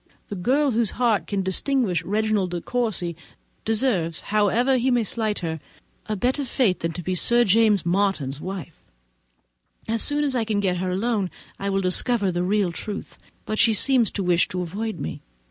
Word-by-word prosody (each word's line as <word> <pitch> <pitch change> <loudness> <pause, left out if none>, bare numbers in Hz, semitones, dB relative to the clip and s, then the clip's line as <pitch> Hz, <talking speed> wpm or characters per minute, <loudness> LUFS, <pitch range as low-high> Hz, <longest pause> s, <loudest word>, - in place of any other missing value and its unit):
The 205 - -4
girl 265 +10 +1
whose 230 -2 +1
heart 235 -4 +1
can 200 -2 -1
distinguish 195 0 +1
Reginald 210 -2 0
De 175 0 -3
Courcy, 215 -9 -2 0.5
deserves, 210 -8 0
however 220 +5 +2
he 250 +2 +1
may 245 -2 +2
slight 215 0 -2
her, 160 -1 -3 0.5
a 215 - -1
better 255 +7 0
fate 240 -7 +1
than 165 - -2
to 175 - -6
be 185 - -2
Sir 240 +7 +3
James 210 -3 +3
Martin's 170 -7 0
wife. 185 -4 -7 1.1
As 225 0 +1
soon 295 0 +2
as 275 -3 0
I 240 - +1
can 215 -2 -1
get 185 -3 0
her 185 +1 -2
alone, 200 0 0 0.3
I 200 - -2
will 195 0 0
discover 195 +2 +2
the 175 0 -1
real 195 0 +1
truth; 205 +5 -7 0.3
but 215 - -3
she 225 -2 +5
seems 245 +1 +4
to 200 - -2
wish 175 -1 +3
to 180 -1 -3
avoid 210 +6 -4
me. 80 - -5
205 Hz, 180 wpm, -24 LUFS, 185-235 Hz, 1.1 s, she